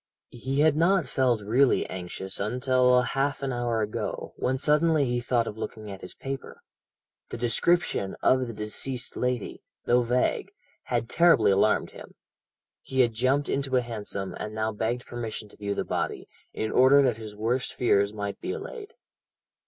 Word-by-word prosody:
"He 130 Hz, +4 st, -2 dB
had 155 Hz, -1 st, +4 dB
not 170 Hz, +2 st, +3 dB
felt 125 Hz, -3 st, +1 dB
really 125 Hz, +6 st, +3 dB
anxious 95 Hz, +1 st, -5 dB
until 125 Hz, +3 st, +3 dB
half 135 Hz, +2 st, -1 dB
an 135 Hz, -2 st, -1 dB
hour 120 Hz, -2 st, -1 dB
ago, 105 Hz, -, -4 dB
when 130 Hz, +1 st, -1 dB
suddenly 150 Hz, +1 st, +3 dB
he 120 Hz, -1 st, -1 dB
thought 120 Hz, -1 st, +1 dB
of 110 Hz, -1 st, -7 dB
looking 110 Hz, -1 st, -6 dB
at 95 Hz, -, -9 dB
his 90 Hz, -, -9 dB
paper. 135 Hz, 0 st, -7 dB, 0.7 s
The -, -, -5 dB
description 120 Hz, -, +1 dB
of 130 Hz, -1 st, +3 dB
the -, -, -5 dB
deceased 115 Hz, +4 st, -4 dB
lady, 125 Hz, -3 st, -2 dB, 0.2 s
though 125 Hz, +1 st, +4 dB
vague, 125 Hz, +1 st, 0 dB, 0.4 s
had 120 Hz, -2 st, -1 dB
terribly 125 Hz, -8 st, +5 dB
alarmed 100 Hz, +2 st, +2 dB
him. -, -, -12 dB, 0.7 s
He 130 Hz, 0 st, +1 dB
had 120 Hz, -2 st, +2 dB
jumped 130 Hz, +5 st, +1 dB
into 135 Hz, -1 st, -1 dB
a -, -, +3 dB
hansom, 105 Hz, -5 st, -5 dB
and 105 Hz, 0 st, -5 dB
now 110 Hz, 0 st, -1 dB
begged 115 Hz, +3 st, -2 dB
permission 110 Hz, -3 st, -6 dB
to -, -, -17 dB
view 100 Hz, -1 st, -3 dB
the -, -, -2 dB
body, -, -, -3 dB, 0.2 s
in 110 Hz, -, -3 dB
order 135 Hz, +2 st, +6 dB
that 125 Hz, -4 st, +1 dB
his 110 Hz, -2 st, -9 dB
worst 120 Hz, +4 st, -1 dB
fears 100 Hz, -4 st, +2 dB
might 100 Hz, -1 st, -5 dB
be 380 Hz, -, -3 dB
allayed. 455 Hz, 0 st, -8 dB
120 Hz, 170 wpm, -27 LUFS, 110-135 Hz, 0.7 s, order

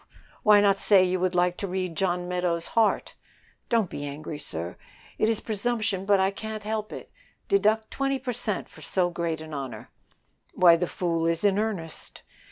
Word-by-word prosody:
"Why 210 Hz, -1 st, +6 dB
not 200 Hz, -1 st, +3 dB
say 195 Hz, -3 st, +5 dB
you 185 Hz, 0 st, 0 dB
would 180 Hz, 0 st, 0 dB
like 180 Hz, 0 st, +2 dB
to 200 Hz, -, -3 dB
read 185 Hz, -2 st, -3 dB
John 180 Hz, 0 st, 0 dB
Meadows' 180 Hz, -2 st, -1 dB
heart?" 225 Hz, -2 st, +1 dB, 0.6 s
"Don't 225 Hz, -4 st, +2 dB
be 145 Hz, -, -6 dB
angry, 145 Hz, +1 st, -6 dB
sir; 85 Hz, -, -6 dB, 0.4 s
it 215 Hz, -, +3 dB
is 225 Hz, -2 st, +1 dB
presumption, 215 Hz, -2 st, -1 dB
but 200 Hz, -1 st, +5 dB
I 190 Hz, +1 st, +3 dB
can't 215 Hz, +1 st, -6 dB
help 215 Hz, 0 st, -3 dB
it. -, -, -9 dB, 0.4 s
Deduct 220 Hz, -, +2 dB
twenty 275 Hz, 0 st, 0 dB
per 255 Hz, -1 st, -4 dB
cent 215 Hz, -3 st, -3 dB
for -, -, -16 dB
so 180 Hz, -2 st, 0 dB
great 170 Hz, -2 st, -2 dB
a 160 Hz, 0 st, -9 dB
honor." 130 Hz, -7 st, -6 dB, 0.6 s
"Why, 175 Hz, -2 st, +7 dB
the 175 Hz, +1 st, -1 dB
fool 165 Hz, -2 st, -1 dB
is 165 Hz, +1 st, 0 dB
in 200 Hz, -1 st, +3 dB
earnest." 195 Hz, -8 st, -4 dB
185 Hz, 180 wpm, -26 LUFS, 170-215 Hz, 0.6 s, Why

